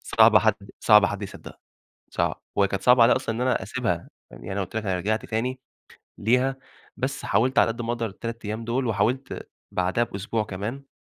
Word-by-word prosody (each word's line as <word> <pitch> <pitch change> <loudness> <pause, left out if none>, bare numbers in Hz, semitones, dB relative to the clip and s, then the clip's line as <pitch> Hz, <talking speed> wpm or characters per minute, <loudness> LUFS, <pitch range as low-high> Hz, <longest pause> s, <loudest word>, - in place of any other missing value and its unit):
صعبة 110 -1 +5
حد 110 -1 +3 0.3
صعبة 105 -2 +6
حد 100 0 -4
يصدّقها، 100 - -9 0.5
صعب. - - -1
وهي 100 -1 +3
كانت 100 -1 -3
صعبة 125 +1 +6
عليّا 115 - +6
أصلًا 115 -3 -2
إن 120 - -4
أنا 125 -5 +1
أسيبها 105 -5 -2 0.2
فاهمني، - - -12
يعني 95 - -4
أنا 100 - -2
قُلت 100 - -10
لك 110 - 0
أنا 95 -2 0
رجعت 110 +4 -1
تاني 125 +4 -2 0.6
ليها، 125 +5 +2 0.4
بس 135 +1 -3
حاولت 130 +4 +2
على - - +5
قد 115 +1 -6
ما 115 - -2
أقدر 115 -1 -2
ال3 115 +2 -6
أيام 110 +2 -4
دُول 125 +3 -1
وحاولت 115 +6 -1 0.2
بعدها 90 +6 +1
بأسبوع 105 +1 -3
كمان 110 +8 -6
115 Hz, 195 wpm, -25 LUFS, 100-125 Hz, 0.6 s, صعبة